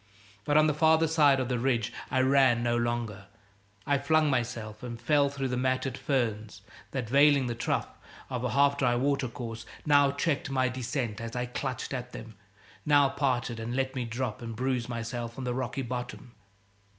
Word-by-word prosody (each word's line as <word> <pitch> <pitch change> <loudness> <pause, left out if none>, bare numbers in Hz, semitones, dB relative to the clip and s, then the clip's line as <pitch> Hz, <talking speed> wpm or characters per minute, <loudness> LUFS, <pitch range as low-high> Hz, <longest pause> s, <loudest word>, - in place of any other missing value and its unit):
But 145 - +3
on 155 - +6
the 155 - +2
farther 160 +1 +4
side 150 -4 +4
of 130 - -1
the 125 -1 -1
ridge 120 -3 0 0.2
I 130 - +2
ran 130 -3 +4
no 120 0 +1
longer. 120 -4 -2 0.6
I 140 -1 +2
flung 155 +1 +2
myself 115 -4 -3
and 120 -2 -6
fell 145 +1 +3
through 135 -1 -3
the 125 - -1
matted 130 0 0
ferns 110 -7 -2 0.3
that, 130 -4 -3
veiling 140 +2 +5
the 120 - -2
trough 115 - -3 0.3
of 125 -2 -4
a 125 - 0
half 140 0 +3
dry 125 -2 +2
watercourse, 120 -3 -2 0.2
now 145 -2 +5
checked 160 0 -1
my 130 -1 +1
descent 125 -3 -3
as 115 +1 -6
I 125 0 -1
clutched 130 +1 -4
at 125 -1 -5
them, 115 0 -9 0.5
now 145 -2 +4
parted 130 -4 -1
and 115 +2 -4
let 130 0 -1
me 130 - -2
drop 115 -1 -4
and 115 -1 -6
bruise 125 0 -1
myself 120 0 -5
on 135 - -5
the 125 -1 -1
rocky 130 +2 -3
bottom. 125 0 -6
130 Hz, 185 wpm, -29 LUFS, 120-140 Hz, 0.6 s, on